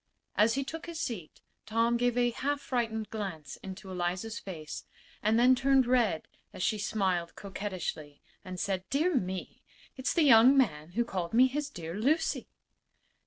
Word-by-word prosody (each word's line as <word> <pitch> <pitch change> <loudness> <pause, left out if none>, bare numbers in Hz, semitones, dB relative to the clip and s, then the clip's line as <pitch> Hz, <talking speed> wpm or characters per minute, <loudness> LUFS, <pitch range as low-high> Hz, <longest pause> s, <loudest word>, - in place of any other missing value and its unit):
As 220 +3 +4
he 275 - 0
took 325 +5 -7
his 335 -1 -5
seat 215 - -5 0.3
Tom 230 +2 +2
gave 245 0 +1
a 245 -1 +3
half 285 +4 -1
frightened 225 -5 -2
glance 185 -10 -5
into 190 0 -9
Eliza's 185 +5 -2
face 160 -5 -7 0.4
and 215 +2 +3
then 250 +2 +6
turned 265 +1 +4
red 235 -9 +2 0.3
as - - -4
she 215 - +1
smiled 185 -5 -1
coquettishly 185 -7 -5 0.2
and 185 -2 -7
said: 190 -1 -1
"Dear 320 +6 +2
me! 190 - -3 0.4
It's 260 - -1
the 335 - +4
young 260 0 +7
man 165 - +1
who 235 +3 +1
called 185 -2 -3
me 250 +2 +7
his 290 +3 -2
dear 165 - -7
Lucy." 270 - +1
220 Hz, 165 wpm, -30 LUFS, 185-255 Hz, 0.4 s, young